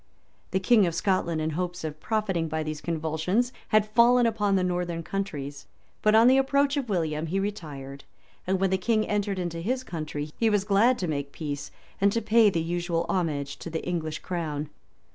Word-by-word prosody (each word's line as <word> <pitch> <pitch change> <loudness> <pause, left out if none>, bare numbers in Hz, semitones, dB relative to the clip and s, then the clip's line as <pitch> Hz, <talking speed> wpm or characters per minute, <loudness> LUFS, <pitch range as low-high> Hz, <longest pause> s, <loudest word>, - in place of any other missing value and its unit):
The 190 - 0
king 210 0 +4
of 165 - -2
Scotland, 170 -5 0
in 155 +1 -1
hopes 180 +2 -3
of 155 -1 -5
profiting 195 -5 -1
by 160 0 -2
these 155 -1 -5
convulsions, 165 +9 -1
had 215 -1 +3
fallen 240 +2 +5
upon 210 -3 +1
the 185 - +2
northern 175 -2 -2
counties; 145 -8 -5 0.3
but 215 0 +4
on 225 +1 +7
the 260 +1 +6
approach 280 +1 +2
of 275 -5 -2
William, 160 -4 -1
he 190 +5 -1
retired; 145 -9 -5 0.4
and 190 0 +1
when 195 0 +1
the 190 - +1
king 215 +2 +1
entered 205 -1 -1
his 180 +9 -2
country, 155 -6 -5
he 225 - +3
was 205 -2 +2
glad 210 +5 +3
to 180 - -2
make 140 -2 -3
peace, 145 -2 -5 0.3
and 200 0 +5
to 230 - +1
pay 220 0 +5
the 170 - -1
usual 170 0 -1
homage 145 -6 -1
to - - -7
the 160 0 -4
English 160 -3 -2
crown. 155 -4 -3
180 Hz, 190 wpm, -27 LUFS, 160-215 Hz, 0.4 s, on